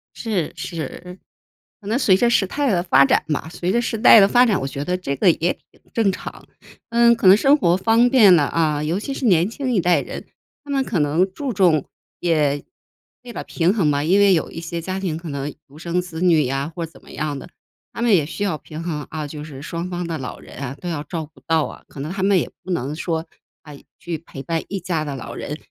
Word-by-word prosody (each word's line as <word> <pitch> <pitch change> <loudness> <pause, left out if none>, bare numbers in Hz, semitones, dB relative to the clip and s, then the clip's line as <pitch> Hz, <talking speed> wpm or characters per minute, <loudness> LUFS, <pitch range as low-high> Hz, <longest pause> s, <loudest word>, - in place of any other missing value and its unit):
是， 205 -9 -2
是。 180 +2 -7 0.6
可 200 - -11
能 225 +4 +1
随 200 -9 +4
着 235 +5 +3
时 225 -4 +3
代 280 +4 -1
的 175 -2 +1
发 175 -6 +5
展 - - +2
嘛 160 +1 -2
随 180 +1 -2
着 235 - +2
时 230 -1 -2
代 225 0 +8
的 195 - +6
发 245 +4 +5
展， 210 -5 +2
我 135 - -2
觉 140 +1 -5
得 180 - 0
这 140 -6 -3
个 180 +4 +4
也 170 +2 0 0.2
挺 - - -27
正 215 -4 +2
常。 - - -8 0.4
嗯， 235 0 +5
可 230 - -4
能 190 - +9
生 275 +7 +4
活 175 -9 +3
方 225 +5 +3
便 210 -9 +7
了 150 - +3
啊， 150 0 0
尤 170 +6 -1
其 275 - -4
是 270 - -3
年 180 -2 +4
轻 255 +1 -3
一 190 - +2
代 175 0 +3
人， - - -7 0.4
他 290 - -16
们 270 -1 +1
可 195 -9 -2
能 160 +6 +1
注 280 +2 -3
重， 175 -7 +3 0.4
也 150 -4 +1 0.6
为 240 -2 -9
了 - - -5
平 175 +3 +1
衡 190 -9 +1
嘛， 145 0 +1
因 185 +6 +3
为 200 -2 +6
有 160 - -2
一 - - -7
些 170 0 -4
家 185 +3 -4
庭 175 -5 -2
可 165 0 -8
能 140 0 -4 0.2
独 145 +2 -15
生 175 +1 -1
子 175 -2 -8
女 165 -6 +4
呀 135 +5 -2
或 170 -2 -3
怎 165 - -16
么 - - -15
样 145 -1 -3
的。 175 - -11 0.4
他 - - -6
们 235 -2 +3
也 160 -5 +2
需 185 +6 -5
要 185 -7 -1
平 155 +1 -9
衡 155 -4 -4
啊， 155 -1 -5
就 150 0 -8
是 140 -3 -9
双 170 +3 -5
方 175 -1 -4
的 165 - -3
老 125 - -6
人 - - -14
啊 140 -1 -5
都 180 - -7
要 160 -4 -3
照 160 +1 -5
顾 150 -3 -22
到 160 -2 +2
啊， - - -10
可 140 - -12
能 150 +5 -4
他 190 -1 -4
们 195 -1 +4
也 - - -3
不 185 - -6
能 145 -2 -2
说， 165 -1 -2 0.4
啊， 150 - -11 0.3
去 170 -2 -4
陪 135 -4 -10
伴 165 0 -2
一 195 - -3
家 165 -4 -2
的 145 -2 -5
老 130 - -7
人， 150 - -5
175 Hz, 270 characters per minute, -21 LUFS, 155-200 Hz, 0.6 s, 能